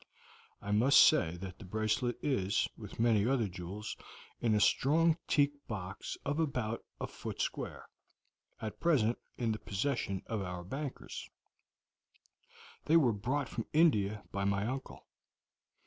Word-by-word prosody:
I 100 - -3
must 120 +7 +5
say 90 - +5
that 95 0 -8
the 105 - -9
bracelet 110 +5 0
is, 100 -9 +1
with - - -10
many 115 -2 +4
other 125 -5 +2
jewels, 95 +4 -6 0.4
in 110 -2 +2
a - - +3
strong 160 +9 +4
teak 145 -1 +4 0.2
box 100 -2 -5
of 145 +3 -1
about 125 -8 -1 0.2
a - - -2
foot - - -7
square, - - -3 0.7
at 110 -1 -6
present 125 -9 +2 0.2
in 115 -2 0
the 110 - -3
possession 100 -2 -2
of 110 -3 -2
our 90 -2 -5
bankers; 135 +8 -6 1.6
they 165 - +5
were 130 -8 +4
brought 125 +7 -1
from 115 - -5
India 105 -11 +3
by 100 - -2
my 100 +1 +1
uncle. 130 +3 -5
110 Hz, 140 wpm, -33 LUFS, 100-135 Hz, 1.6 s, must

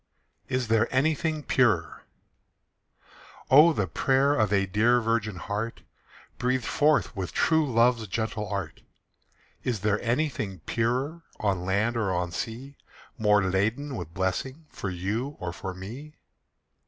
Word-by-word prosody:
IS 130 -2 -1
THERE 115 +1 +3
ANYTHING 155 +3 +1
PURER? 110 -14 +1 1.5
Oh, 150 +5 +8
the 105 -11 0
prayer 135 - +2
of 110 -7 +1
a 100 -1 +3
dear 115 +6 +3
virgin 115 -3 -1
heart, 105 +5 -4 0.6
Breathed 125 -1 0
forth 150 -4 +2
with 95 -3 -4
true 160 -4 +2
love's 115 -1 +3
gentle 105 +1 -3
art! 95 -5 -4 0.8
Is 120 -6 -2
there 105 0 +1
anything 120 - -1
purer 130 - -1 0.2
On 95 -4 0
land 105 +5 +1
or 105 -4 0
on 90 -1 -1
sea, 125 +9 -6 0.4
More 105 -1 +4
laden 110 +10 0
with 85 -6 -6
blessing 95 - -3
For 100 - -5
you 105 +10 -3
or 85 -1 -4
for 95 +1 -5
me? 125 +12 -9
115 Hz, 130 wpm, -27 LUFS, 95-130 Hz, 1.5 s, Oh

